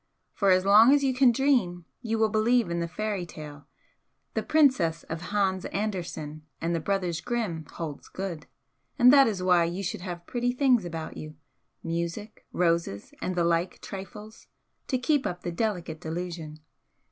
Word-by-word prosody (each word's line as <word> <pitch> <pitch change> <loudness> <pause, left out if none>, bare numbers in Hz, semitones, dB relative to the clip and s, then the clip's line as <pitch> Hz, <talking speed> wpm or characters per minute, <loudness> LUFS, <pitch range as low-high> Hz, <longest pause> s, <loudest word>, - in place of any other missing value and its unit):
For 200 - +1
as 185 0 +4
long 215 +5 +7
as 285 - +1
you 265 -1 +2
can 255 -1 +5
dream 230 -10 +1 0.2
you 225 -2 -1
will 220 0 +3
believe 220 -1 +2
in 170 - -1
the 170 - -1
fairy 205 +1 -3
tale; 150 -3 -10 0.7
the - - 0
'princess' 255 - +3
of 165 +2 -6
Hans 195 -2 0
Andersen 175 -7 -4 0.2
and 165 +1 -1
the 165 - 0
Brothers 180 -1 -1
Grimm 180 -9 -3
holds 160 -4 -6
good 180 -5 -5 0.5
and 250 0 +7
that 275 -1 +7
is 195 -5 -2
why 180 -2 +4
you 175 +4 -3
should 180 - -3
have 175 -2 -6
pretty 245 0 -1
things 250 -5 +3
about 165 -2 -6
you, 155 0 -8 0.5
music, 170 +6 -4
roses 170 - 0
and 185 - -2
the 175 - +2
like 170 +2 0
trifles, 210 +3 -9 0.4
to 260 - +1
keep 275 +2 +1
up 175 0 -6
the 175 - -3
delicate 175 -5 -2
delusion." 165 -2 -5
185 Hz, 170 wpm, -27 LUFS, 170-220 Hz, 0.7 s, long